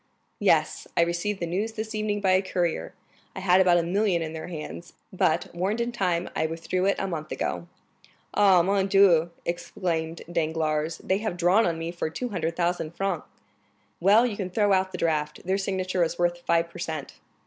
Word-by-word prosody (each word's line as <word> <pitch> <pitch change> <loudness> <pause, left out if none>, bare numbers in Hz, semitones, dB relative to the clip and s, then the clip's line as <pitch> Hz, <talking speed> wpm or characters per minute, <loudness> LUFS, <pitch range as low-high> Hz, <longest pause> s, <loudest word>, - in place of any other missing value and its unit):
"Yes; - - +2
I - - +6
received 175 +4 -2
the 170 - -1
news 200 +7 -2
this 220 0 -5
evening 215 -1 -1
by 190 -2 +3
a 185 0 +4
courier. 180 -2 -2 0.4
I - - -4
had 185 0 +4
about 180 -2 +5
a 170 - +2
million 180 -1 +1
in 160 0 -5
their 160 - -6
hands, 155 - -7 0.2
but, - - +1
warned 190 +6 -1
in 235 +1 -1
time, 180 -6 0
I 160 - +1
withdrew 170 +3 -1
it 200 - +3
a - - -2
month 155 -4 -5
ago." 170 - -3 0.7
"Ah, 195 -4 +5
mon 195 +1 +1
Dieu!" 190 -4 +5 0.2
exclaimed 170 -1 -3
Danglars, 160 -1 -1
"they 190 +1 +1
have 215 -5 -3
drawn 180 +5 +4
on 165 -1 -1
me 165 +1 -4
for 175 -2 -3
200,000 170 -4 -2
francs!" 195 -4 -2 0.7
"Well, 205 +7 +5
you 230 -4 -2
can 195 -3 -4
throw 205 +1 +2
out 190 0 +1
the 180 - -5
draft; 150 -2 -1
their 190 +2 +1
signature 185 -2 0
is 170 +1 -2
worth 175 0 +1
five 170 0 +2
per 175 - -10
cent." 160 -4 -5
180 Hz, 190 wpm, -26 LUFS, 165-195 Hz, 0.7 s, I